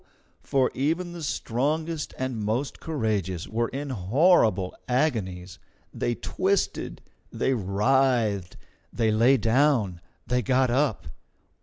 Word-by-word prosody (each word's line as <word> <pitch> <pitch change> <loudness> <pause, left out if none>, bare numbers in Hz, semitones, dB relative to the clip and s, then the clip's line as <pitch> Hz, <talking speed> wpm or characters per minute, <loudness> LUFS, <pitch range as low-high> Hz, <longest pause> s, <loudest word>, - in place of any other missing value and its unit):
For 130 -2 +1
even 165 +6 -1
the 170 - -7
strongest 150 +4 -2
and 130 -3 -3
most 120 +7 -2
courageous 105 - -2
were 115 +1 -1
in 140 +3 -5
horrible 110 - +3
agonies. 105 - -1 0.3
They 120 - -1
twisted, 195 +8 -1 0.3
they 135 - 0
writhed, 110 -1 +1 0.3
they 115 -2 +1
lay 120 +5 +4
down, 115 - +2 0.2
they 125 +1 +1
got 130 +2 +2
up. 135 -2 +1
125 Hz, 110 wpm, -26 LUFS, 105-140 Hz, 0.3 s, lay